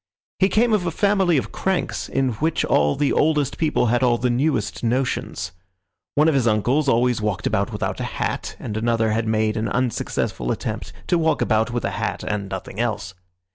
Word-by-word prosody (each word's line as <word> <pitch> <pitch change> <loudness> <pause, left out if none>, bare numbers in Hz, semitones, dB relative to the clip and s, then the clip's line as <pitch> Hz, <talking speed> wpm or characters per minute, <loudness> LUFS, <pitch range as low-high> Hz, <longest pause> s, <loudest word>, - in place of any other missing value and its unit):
He 190 +1 +4
came 225 +4 +3
of 185 -4 +1
a - - +2
family 190 -2 +2
of 130 - -2
cranks, 190 -1 -2
in 135 -1 +1
which 160 +1 +1
all 75 0 +3
the 145 - +1
oldest 150 -3 +1
people 155 -5 +2
had 120 - +2
all 120 -2 +3
the 125 +1 0
newest 125 -4 0
notions. 120 -6 -1 0.6
One 150 +2 +4
of 160 - +4
his 130 -4 +2
uncles 125 +7 +2
always 120 -1 +2
walked 105 -3 -2
about - - 0
without - - -3
a - - -2
hat, - - -2
and 105 - -6
another 115 0 +1
had 110 +1 0
made 110 0 +1
an 110 0 -1
unsuccessful 120 - -1
attempt - - -4
to 175 - +2
walk 160 -1 +2
about 110 +1 +2
with 120 -1 -2
a - - -1
hat - - -3
and 100 -2 -2
nothing 95 +2 -6
else. 105 -5 -2
120 Hz, 195 wpm, -22 LUFS, 110-155 Hz, 0.6 s, He